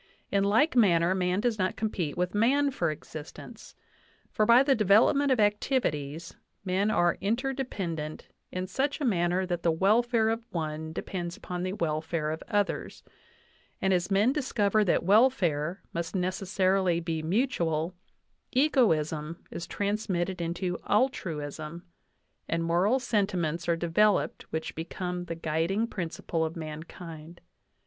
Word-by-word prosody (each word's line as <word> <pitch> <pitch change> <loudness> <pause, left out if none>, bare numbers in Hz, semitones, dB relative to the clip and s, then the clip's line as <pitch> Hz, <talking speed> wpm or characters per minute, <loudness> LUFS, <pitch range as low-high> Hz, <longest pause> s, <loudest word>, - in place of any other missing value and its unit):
In 200 0 +2
like 225 +10 +3
manner, 180 -6 +4
man 185 +1 0
does 230 -2 0
not 185 0 0
compete 180 -9 -2
with 180 0 -1
man 275 +7 +3
for 170 -10 0
existence; 155 0 -9 0.6
for, 215 - +1
by 235 +3 +7
the 275 0 +4
development 230 +7 +4
of 255 - +3
activities, 170 - 0 0.3
men 190 +3 +1
are 175 -4 +2
interdependent 205 - -3 0.2
in 185 0 -3
such 270 - -1
a 295 - -1
manner 180 -3 +1
that 175 -2 -2
the 170 - +2
welfare 220 +6 +3
of 225 +1 -1
one 160 -1 -4
depends 175 +1 -5
upon 180 -1 -5
the 185 +1 -2
welfare 155 -2 -1
of 160 - -5
others; 205 -3 -1 0.8
and 190 0 +2
as 180 0 0
men 205 +6 +3
discover 215 -7 +1
that 185 - +2
welfare 185 - +2
must 170 +2 -3
necessarily 185 -1 +1
be 165 -2 -3
mutual, 170 - 0 0.6
egoism 165 - +2
is 170 - -6
transmitted 190 -3 -2
into 175 +1 -2
altruism, 165 - -1 0.7
and 165 0 0
moral 175 +9 +2
sentiments 185 -9 -1
are 170 - +4
developed 185 +5 +1
which 160 0 -3
become 180 +2 -4
the 170 - -4
guiding 165 +7 0
principle 170 -5 -3
of 160 0 -3
mankind. 160 +1 -8
185 Hz, 135 wpm, -28 LUFS, 165-215 Hz, 0.8 s, by